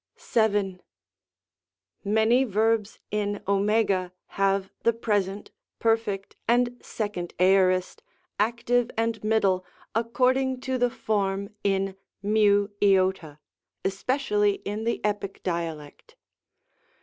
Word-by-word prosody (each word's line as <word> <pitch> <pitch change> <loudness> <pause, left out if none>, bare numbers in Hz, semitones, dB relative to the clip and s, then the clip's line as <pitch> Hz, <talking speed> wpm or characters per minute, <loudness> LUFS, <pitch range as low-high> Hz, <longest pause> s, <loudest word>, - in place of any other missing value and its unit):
VII. 205 -4 0 1.2
Many 220 +5 +3
verbs 220 -1 +1
in 205 -1 -1
6? 200 -2 +1 0.2
have 195 0 0
the 230 - +3
Present, 205 -3 -1 0.3
Perfect, 225 -4 0
and 240 +1 +3
2d 205 -5 -4
Aorist, 185 - +3 0.4
Act. 235 +3 -1
and 230 -2 +1
Mid., 220 0 +2 0.5
according 255 +3 +1
to 260 -1 -2
the 245 0 +3
form 200 -2 -1
in 195 -1 0 0.3
^/, 200 -5 +2 0.5
especially 210 0 +1
in 210 +2 -3
the 235 - -1
Epic 205 -2 -3
Dialect. 165 -4 -5
205 Hz, 90 wpm, -26 LUFS, 195-225 Hz, 1.2 s, Many